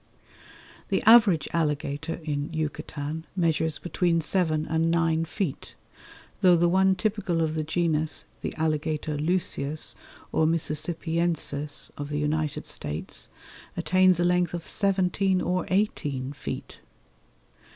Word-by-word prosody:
The - - +1
average 210 - +6
alligator 150 0 -1
in 145 -2 -2
Yucatan 155 0 -4
measures 160 -3 +1
between 175 -1 0
seven 155 -2 +1
and 160 +1 +1
nine 165 -1 +2
feet, 175 -3 -4 0.6
though 180 -2 +6
the 175 +1 +3
one 190 +2 +4
typical 200 -3 -1
of 160 -1 +1
the 155 -1 -1
genus, 160 -1 0 0.2
the - - -3
Alligator 155 -1 -1
lucius 155 -2 0 0.4
or 160 - +2
mississippiensis 160 -1 -1
of 145 0 -4
the 150 - -2
United 150 0 -1
States, 75 +1 -5 0.5
attains 185 +1 +4
a - - +3
length 175 0 +2
of 170 - -6
seventeen 190 -1 +1
or 180 0 -1
eighteen 145 -9 -1
feet. - - -7
160 Hz, 120 wpm, -26 LUFS, 150-180 Hz, 0.6 s, average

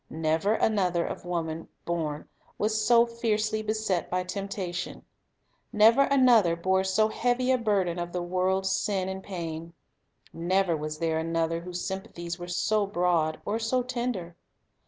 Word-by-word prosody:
Never 160 +5 +1
another 180 -7 +1
of - - -6
woman 165 -2 -3 0.2
born 155 -3 -3 0.3
was 215 +1 0
so 235 0 +6
fiercely 220 -2 -1
beset 215 -5 -1
by 180 0 0
temptation; 185 -1 -5 0.7
never 225 +4 +6
another 245 -11 +5
bore 190 +2 +1
so 190 +3 +2
heavy 245 +3 +1
a 260 - +4
burden 195 -6 0
of 175 0 -4
the 180 0 -2
world's 185 +2 0
sin 190 -1 0
and 190 0 -4
pain. 165 -3 -6 0.6
Never 180 +1 +1
was 155 0 -4
there 160 0 0
another 165 0 0
whose 180 0 -5
sympathies 190 -3 -5
were 175 - -6
so 205 +3 +1
broad 175 -4 +1
or 215 +2 -1
so 245 +3 0
tender. 240 -9 -3
185 Hz, 145 wpm, -27 LUFS, 170-215 Hz, 0.7 s, so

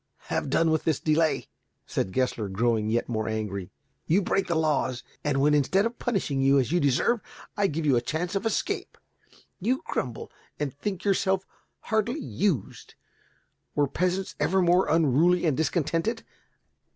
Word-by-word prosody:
"Have - - -1
done 165 -1 +3
with 160 - +1
this 160 -4 +1
delay," 155 0 +1 0.4
said 95 - -2
Gessler, 125 -2 0
growing 110 +2 +1
yet 120 +1 0
more 110 -2 -2
angry. 105 -4 -3 0.4
"You 190 +5 +3
break 195 +2 0
the 170 - 0
laws, 150 -6 0 0.2
and 145 -2 +1
when, 150 +2 +4
instead 165 +8 +3
of 230 +1 -3
punishing 180 - -1
you 135 +1 +5
as 130 0 +1
you 175 - +3
deserve, 145 - +2 0.3
I 205 -2 +2
give 160 -2 -3
you 140 -4 +4
a 120 - +2
chance 160 +8 -3
of 195 0 -1
escape, 225 - -2 0.6
you 250 +8 0
grumble 125 -3 -4 0.3
and 145 -3 -2
think 185 +6 -4
yourself 195 -1 +1 0.4
hardly 220 +6 0
used. 200 - -2 0.8
Were 145 - +3
peasants 185 +6 -1
ever 190 - +2
more 180 +1 +3
unruly 165 +3 +3
and 155 -5 +2
discontented? 165 - 0
160 Hz, 160 wpm, -27 LUFS, 130-190 Hz, 0.8 s, you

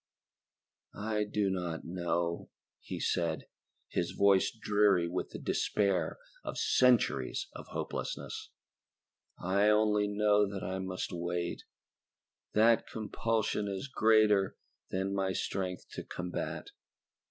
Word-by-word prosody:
"I 105 0 0
do 105 -1 0
not 90 -3 -3
know," 85 -1 -1 0.3
he - - -6
said, 85 -2 0 0.5
his - - -1
voice 100 -1 +4
dreary 105 -5 +2
with 90 +2 -3
the - - -7
despair 100 -2 0 0.3
of - - -5
centuries 125 -3 +3
of - - -9
hopelessness. - - -4 0.9
"I 100 +4 +2
only 105 -1 +3
know 105 0 +3
that 100 -2 -5
I 95 +1 -2
must 95 -1 -3
wait 85 0 -3 0.9
that 115 +2 +4
compulsion 110 -1 -1
is 100 +5 -3
greater 110 -5 +4 0.3
than 95 +1 -1
my 95 -1 0
strength 90 0 -3
to - - -6
combat." 90 0 -4
100 Hz, 110 wpm, -32 LUFS, 90-105 Hz, 0.9 s, voice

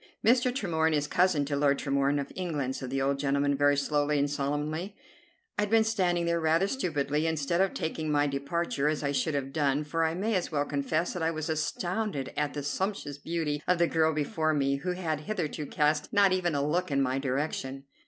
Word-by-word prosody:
"Mr. 245 +2 +4
Tremorne 160 - 0
is 145 -1 +1
cousin 175 -3 +2
to 140 0 -2
Lord 140 -1 +3
Tremorne, 140 +1 +1
of 140 - -5
England," 150 -8 -2
said 130 - -5
the 135 +1 -1
old 140 0 0
gentleman 140 0 +1
very 145 0 +3
slowly 145 +1 +1
and 140 0 +2
solemnly. 150 +6 -2 0.6
I - - +5
had 210 - 0
been 225 0 +5
standing 180 -6 +1
there 170 0 +1
rather 165 +4 +2
stupidly, 155 - -1
instead 160 +2 0
of 195 - +1
taking 160 -1 -3
my 145 0 +3
departure, 140 +1 -1
as 150 0 0
I 140 - 0
should 145 +2 0
have 135 -1 -3
done, 145 -1 +1
for 165 +2 -1
I 160 0 0
may 210 +5 -1
as 185 -4 -1
well 145 -2 0
confess 150 +4 -1
that 180 - -4
I 160 - +2
was 155 0 -3
astounded 175 +1 -2
at 150 -1 -1
the 145 - -3
sumptuous 145 -2 -3
beauty 150 -2 -2
of 180 - +3
the 170 - +4
girl 160 -1 +2
before 155 +1 0
me, 140 -1 +1
who 180 +6 -2
had 165 -4 -2
hitherto 155 -3 -3
cast 150 0 +1
not 200 -2 +5
even 175 -4 +1
a 140 0 +1
look 175 +4 0
in 140 -1 +1
my 130 +1 0
direction. 135 0 -2
150 Hz, 215 wpm, -29 LUFS, 140-170 Hz, 0.6 s, I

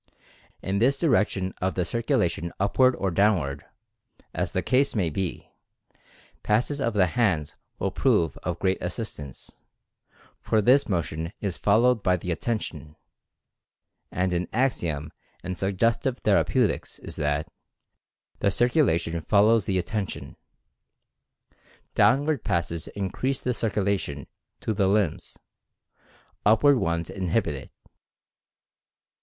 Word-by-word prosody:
In 95 +1 -1
this 135 +5 +3
direction 105 - +1
of 95 +1 0
the 90 - 0
circulation 105 - 0
upward 130 +6 +3
or 95 -1 -1
down 100 +4 +4
ward 70 -4 -5 0.7
(as - - -2
the - - -1
case 130 +1 +2
may 90 -7 +1
be) 95 +2 -4 0.9
passes 125 +7 0
of 115 -4 -1
the 95 -3 +5
hands 90 -7 0 0.2
will - - -1
prove 80 - +2
of 90 -2 -3
great 95 +1 0
assistance, 90 - -7 0.8
for 110 - +1
this 125 +6 +4
motion 85 -1 -2
is 100 -4 -3
followed 115 +3 +3
by 90 -2 +2
the 90 +1 -4
Attention, 80 - -4 1.2
and 90 0 0
an 90 +1 -1
axiom 85 - -1 0.3
in 95 +1 -3
Suggestive 115 +7 0
Thera - - +4
peutics - - 0
is - - -7
that 75 +1 -1 0.9
"The - - +2
Circulation 95 - +1
follows 110 +5 +3
the 95 -3 +1
Atten 95 +3 -2
tion." - - -9 1.6
Downward 145 -1 +3
passes 85 -1 -1
increase 115 +7 -3
the 125 - 0
circulation 100 -10 -1 0.4
to 110 - -1
the 100 -2 +1
limbs 100 -4 0 0.6
— - - -33
upward 115 +7 +5
ones 85 -2 -1
inhibit 95 -1 -1
it. 70 - -9
100 Hz, 125 wpm, -26 LUFS, 85-115 Hz, 1.6 s, the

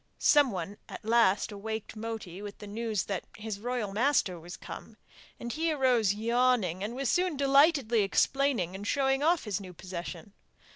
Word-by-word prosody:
Someone 205 - +2
at - - -9
last 220 -4 +3
awaked 220 +2 -5
Moti 215 -4 -6
with 205 -1 -8
the - - -10
news 215 -1 -2
that 195 -4 -4
his 215 -2 -5
royal 235 -3 -3
master 215 -6 +2
was 175 +2 -9
come; - - -10 0.4
and 235 0 -5
he 325 +1 0
arose 250 -8 +2
yawning, 230 -5 +1
and 220 +4 -4
was 270 0 -2
soon 360 -1 +1
delightedly 275 -4 +4
explaining 230 -2 +1
and 200 +2 -6
showing 270 +1 +1
off 330 +2 +3
his 210 -2 -3
new 185 -2 -9
possession. 180 +1 -7
220 Hz, 160 wpm, -29 LUFS, 200-270 Hz, 0.4 s, delightedly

